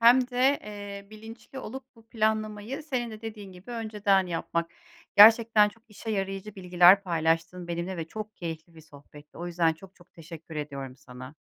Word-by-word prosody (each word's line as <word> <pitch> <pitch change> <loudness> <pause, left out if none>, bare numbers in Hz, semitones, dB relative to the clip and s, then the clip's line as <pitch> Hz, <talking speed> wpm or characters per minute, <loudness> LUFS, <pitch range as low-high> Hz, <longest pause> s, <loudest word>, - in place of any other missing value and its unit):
hem 245 +2 +6
de, 260 +3 +3
eee, 205 -1 -8
bilinçli 225 +4 -11
olup 260 +1 -7
bu 225 -1 -20
planlamayı, 215 +4 -1
senin 255 -6 -3
de 215 -1 -10
dediğin 210 -3 -8
gibi, 185 +6 -13
önceden 210 -4 +1
yapmak. 170 -1 -2 0.5
Gerçekten 220 0 +8
çok 225 +2 -17
işe 220 +1 -7
yarayıcı 195 0 -3
bilgiler 180 0 +5
paylaştın 165 0 -1
benimle 170 +2 -3
ve 165 - -3
çok 215 +1 -7
keyifli 165 -1 -7
bir 160 - -13
sohbetti. 145 -1 -16
O 175 - -5
yüzden 170 -2 +2
çok 190 +4 -15
çok 175 - -22
teşekkür 165 -1 -10
ediyorum 140 -3 -6
sana. 130 +1 -12
195 Hz, 165 wpm, -27 LUFS, 170-220 Hz, 0.5 s, Gerçekten